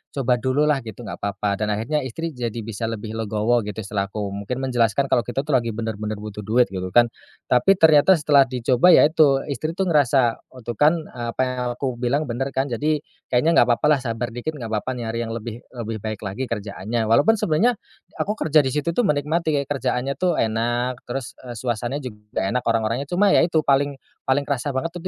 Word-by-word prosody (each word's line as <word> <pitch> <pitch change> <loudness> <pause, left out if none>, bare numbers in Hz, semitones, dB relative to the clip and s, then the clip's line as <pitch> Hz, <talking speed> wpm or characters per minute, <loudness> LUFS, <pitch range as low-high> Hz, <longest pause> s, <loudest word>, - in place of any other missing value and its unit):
coba 125 -3 +1
dululah 140 +3 +2
gitu 110 +3 -8
enggak - - -7
apa-apa 100 0 -2
dan 105 - 0
akhirnya 115 +9 0
istri 160 +5 -4
jadi 120 -3 -4
bisa 115 +1 -4
lebih 110 -1 -5
legowo 110 +2 0
gitu, 105 - -5
setelah 100 0 -2
aku 100 -1 -4
mungkin 125 +6 -4
menjelaskan 125 +1 +1
kalau 120 - +2
kita 120 +2 -2
tuh 145 - -15
lagi 115 -3 +1
benar-benar 110 -1 -4
butuh 105 0 -7
duit 120 +1 +3
gitu 95 -1 -4
kan. 120 -1 +5 0.4
Tapi 125 +10 +5
ternyata 160 0 +6
setelah 145 -4 +4
dicoba 125 +4 +2
ya - - +7
itu 150 -4 +4
istri 155 +3 -3
tuh 190 +1 -1
ngerasa, 135 -6 +3 0.2
"Oh 130 - -12
tuh 115 -1 -6
kan 150 +3 +5 0.2
apa 120 0 -3
yang 130 0 -1 0.2
aku 130 -1 -3
bilang 130 +4 -1
benar 135 +4 -2
kan 135 +1 0
Jadi, 150 +5 0 0.3
kayaknya 140 +7 +3
enggak - - +7
apa-apa 120 - -2
lah - - -6
sabar 120 -1 -3
dikit 120 +6 -5
enggak 120 -5 -6
apa-apa 110 +3 -2
nyari 115 -1 -4
yang 115 - -5
lebih 115 +1 -6
lebih 115 -2 -4
baik 110 -1 -5
lagi 105 +6 -4
kerjaannya." 110 +1 -3
Walaupun 145 - +5
sebenarnya, 200 +9 +2 0.5
aku 210 - -1
kerja 155 -1 +4
di 135 - -1
situ 150 +5 -1
tuh - - +2
menikmati, 155 +2 0
kayak 140 -1 -3
kerjaannya 130 0 -1
tuh 180 -3 +1
enak 120 +3 -1
terus, 130 0 -4
eee, 120 -2 -8
suasananya 120 +4 -2
juga 105 -4 -5
enak, 125 +6 0
orang-orangnya. 115 +5 0
Cuma 195 +3 +3
ya - - +6
itu 165 -2 +2
paling 140 0 +2 0.3
paling 130 +2 +2
kerasa 140 0 -2
banget 150 +6 -1
itu - - -7
125 Hz, 205 wpm, -22 LUFS, 115-145 Hz, 0.5 s, ya